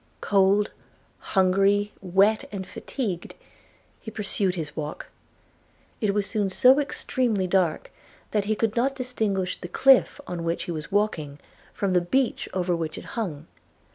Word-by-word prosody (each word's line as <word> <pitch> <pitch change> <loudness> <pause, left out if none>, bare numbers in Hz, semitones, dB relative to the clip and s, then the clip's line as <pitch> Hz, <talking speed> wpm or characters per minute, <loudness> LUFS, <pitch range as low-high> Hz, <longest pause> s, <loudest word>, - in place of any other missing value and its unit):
Cold, 200 +1 +3 0.7
hungry, 195 +2 +3
wet, 195 +4 +3
and 195 -2 -5
fatigued, 195 -8 -5 0.6
he 220 - -8
pursued 200 -3 -1
his 155 -4 -5
walk: 150 -1 -6 0.9
it 210 -3 +1
was 205 0 0
soon 205 -1 -1
so 255 +8 +5
extremely 245 -7 0
dark 180 -3 0 0.4
that 210 -2 +1
he 215 +1 +1
could 220 0 0
not 265 +3 +1
distinguish 215 -8 -2
the 175 - -5
cliff, 270 +8 +4
on 175 -6 -5
which 170 +1 -1
he - - -5
was 155 -2 -6
walking, 170 -9 0 0.3
from 195 -2 -1
the 180 - +4
beach 250 +9 0
over 180 -1 0
which 160 -2 -4
it - - -8
hung. 165 -10 -4
195 Hz, 145 wpm, -25 LUFS, 180-215 Hz, 0.9 s, so